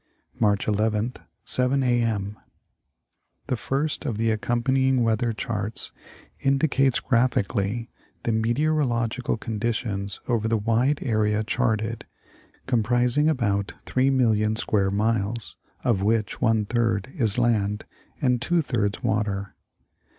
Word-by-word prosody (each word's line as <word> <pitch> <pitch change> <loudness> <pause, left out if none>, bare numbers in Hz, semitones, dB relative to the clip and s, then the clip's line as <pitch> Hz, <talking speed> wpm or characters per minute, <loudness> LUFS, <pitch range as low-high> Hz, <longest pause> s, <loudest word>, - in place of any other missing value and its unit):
March 105 -3 +2
11th, 110 +3 0 0.3
7 130 +2 +2
A. 120 -1 +2
M. 105 -3 -1 1.1
The - - -1
first 140 +7 -1
of 120 -8 -2
the 115 0 +1
accompanying 125 +3 +1
weather 115 +1 +1
charts 110 -2 -3 0.5
indicates 135 -2 +2
graphi 120 -5 +2
cally 105 +4 -2 0.3
the 115 - 0
meteorological 120 0 0
conditions 110 -3 -3
over 115 -3 +1
the 115 0 +2
wide 115 +7 +1
area 110 -3 +1
charted, 110 -1 -1 0.6
comprising 125 +4 +2
about 100 -9 0
3,000,000 115 -5 +2
square 100 -3 +1
miles, 110 +2 0 0.3
of 110 -6 +1
which 110 0 0
one 110 -2 +2
third 115 0 0
is 115 - +1
land 105 -4 +1 0.4
and 125 -2 +2
two 175 +4 +2
thirds 105 -7 -1
water. 105 -3 -1
115 Hz, 115 wpm, -25 LUFS, 105-125 Hz, 1.1 s, March